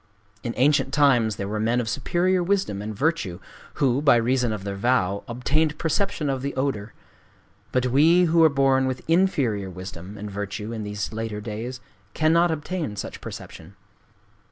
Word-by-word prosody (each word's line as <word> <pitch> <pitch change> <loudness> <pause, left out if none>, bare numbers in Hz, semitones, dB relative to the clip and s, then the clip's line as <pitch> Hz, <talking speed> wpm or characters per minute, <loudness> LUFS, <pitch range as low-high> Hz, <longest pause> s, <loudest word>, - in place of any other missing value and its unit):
_' - - -39 0.4
In 120 - -4
ancient 135 0 +3
times 125 -7 +3
there 100 - -4
were 105 +1 -3
men 115 +3 +1
of 120 - -2
superior 175 +9 +1
wisdom 180 - 0
and 105 +1 -5
virtue 135 - -1 0.4
who, 135 -1 +2
by 140 -4 +6
reason 120 0 +1
of 105 -3 -4
their 100 -1 -4
vow, 100 -3 +1
obtained 150 +6 0
perception 165 0 -1
of 135 -2 -1
the 140 +1 -4
odor; 130 -6 -2 0.8
but 125 0 +1
we, 155 +8 +5
who 165 -1 +4
are 160 - +7
born 135 -2 +2
with 130 -1 -4
inferior 140 - +1
wisdom 95 +2 -9
and 105 0 -6
virtue 105 +2 -5
in 110 - -4
these 105 0 -4
later 110 -1 -4
days, 115 +4 -6 0.3
cannot 165 +2 +3
obtain 160 - -3
such - - -6
perception. 85 +5 -9
125 Hz, 170 wpm, -24 LUFS, 105-150 Hz, 0.8 s, are